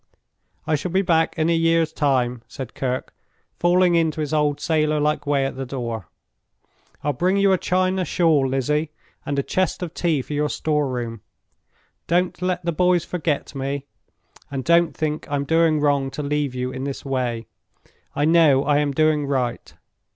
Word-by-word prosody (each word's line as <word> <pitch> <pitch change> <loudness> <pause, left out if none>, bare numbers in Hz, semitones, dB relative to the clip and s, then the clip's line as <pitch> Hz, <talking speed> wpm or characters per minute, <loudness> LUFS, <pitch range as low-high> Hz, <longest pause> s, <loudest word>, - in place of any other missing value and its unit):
"I - - 0
shall 150 +4 -1
be 190 +3 +1
back 165 -2 +1
in 160 0 +1
a 170 - +3
year's 165 -1 +2
time," 125 -4 +1
said 130 -3 -8
Kirke, 130 -1 -3 0.5
falling 175 0 +4
into 160 -2 +1
his 150 0 -2
old 150 -2 +1
sailor 155 -2 +1
like 150 0 0
way 140 -2 +2
at 135 - -3
the 135 - -4
door. 115 - -4 1.0
"I'll 145 - 0
bring 180 +8 +1
you 200 -1 +4
a 185 - +1
China 185 +1 +1
shawl, 160 -6 +2
Lizzie, 150 +4 0 0.4
and 140 - -1
a 140 - +1
chest 185 +3 -1
of 170 -2 -5
tea 160 -6 0
for 150 - -7
your 150 0 0
store 150 -2 0
room. 120 -3 -4 0.9
Don't 180 +2 0
let 180 -1 -1
the 170 - +1
boys 180 0 +2
forget 160 -6 -2
me, 140 0 -3 0.6
and 135 -2 -4
don't 170 +1 +3
think 155 -1 -2
I'm 140 -1 -1
doing 160 0 +3
wrong 140 -2 +1
to 150 - -2
leave 145 -2 -1
you 125 0 -2
in 130 0 -5
this 140 0 -5
way. 125 -4 -2 0.7
I 145 - +1
know 155 -4 +5
I 145 0 +2
am 145 -1 0
doing 155 -1 +2
right. 130 -4 -2
150 Hz, 180 wpm, -22 LUFS, 135-165 Hz, 1.0 s, know